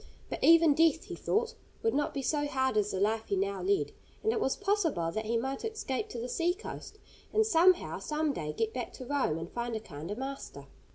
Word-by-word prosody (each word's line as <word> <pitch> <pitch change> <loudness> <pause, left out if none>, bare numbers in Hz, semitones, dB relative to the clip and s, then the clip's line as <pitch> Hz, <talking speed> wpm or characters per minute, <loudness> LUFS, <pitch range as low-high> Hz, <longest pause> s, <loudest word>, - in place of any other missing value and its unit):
But - - -4
even 330 -2 +7
death, 325 +1 +3
he - - -7
thought, 460 +2 0 0.3
would 450 - +2
not 295 0 +1
be 275 - -4
so 290 +3 +1
hard 265 -3 0
as 210 -1 +2
the 190 - -2
life 220 +2 +1
he 400 - 0
now 395 +1 -1
led, 390 +1 +1 0.3
and 440 - +3
it 455 - 0
was 265 - +1
possible 370 - 0
that 220 +4 -3
he 230 +1 +1
might 265 +3 -3
escape 435 -4 -3
to - - -6
the 240 - -3
sea 345 +6 +1
coast, 425 0 -8 0.3
and 440 0 +3
somehow 360 -2 +4
some 305 -1 -1
day 150 - -3
get 225 +7 -1
back 250 -2 -4
to 255 - -8
Rome 260 - 0
and 165 +1 -6
find 240 -1 -3
a - - -1
kinder 170 -1 -7
master. 270 +3 -6
280 Hz, 225 wpm, -31 LUFS, 225-370 Hz, 0.3 s, even